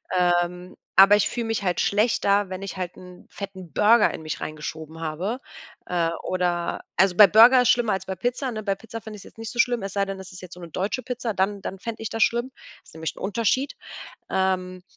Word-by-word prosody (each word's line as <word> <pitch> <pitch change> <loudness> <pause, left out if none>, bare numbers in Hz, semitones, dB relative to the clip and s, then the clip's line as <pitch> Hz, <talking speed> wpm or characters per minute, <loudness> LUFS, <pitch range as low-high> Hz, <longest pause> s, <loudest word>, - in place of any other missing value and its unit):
Ähm, 180 0 0 0.2
aber 195 +2 +8
ich 210 - +2
fühle 235 -1 -3
mich 225 -2 -2
halt 180 -2 0
schlechter, 205 -2 +2
wenn 185 +1 -6
ich 195 -1 -6
halt 180 -1 -4
'n 180 -1 -13
fetten 190 -4 -9
Burger 215 +2 +4
in - - -7
mich 155 0 -5
reingeschoben 155 +1 -7
habe, 180 - -3 0.5
äh, 170 -2 0
oder 175 -2 -1 0.2
also 190 -1 +4
bei 210 - +10
Burger 235 +6 +7
ist - - +2
schlimmer 235 -4 +3
als 190 0 -3
bei 190 - -4
Pizza, 245 - -2
ne? 215 -1 -5
Bei 195 -1 0
Pizza 225 +2 -9
fände 215 0 -9
ich's - - -12
jetzt - - -16
nicht 225 0 -6
so 240 - -11
schlimm, 240 -2 +2
es 195 - -5
sei 200 -1 +1
denn, 195 0 -5
das 190 - -10
ist 185 - -11
jetzt 180 -1 -10
so 180 - -12
'ne 170 -1 -9
deutsche 195 +10 -2
Pizza, 245 -3 -3
dann 195 +1 -1
dann 190 0 -6
fände 225 0 -6
ich 220 - -3
das 225 0 -4
schlimm. 240 +3 0 0.3
Ist - - -18
nämlich 160 0 -5
'n - - -13
Unterschied. 230 +6 0 0.6
Ähm. 185 -1 -1
195 Hz, 230 wpm, -24 LUFS, 180-225 Hz, 0.6 s, bei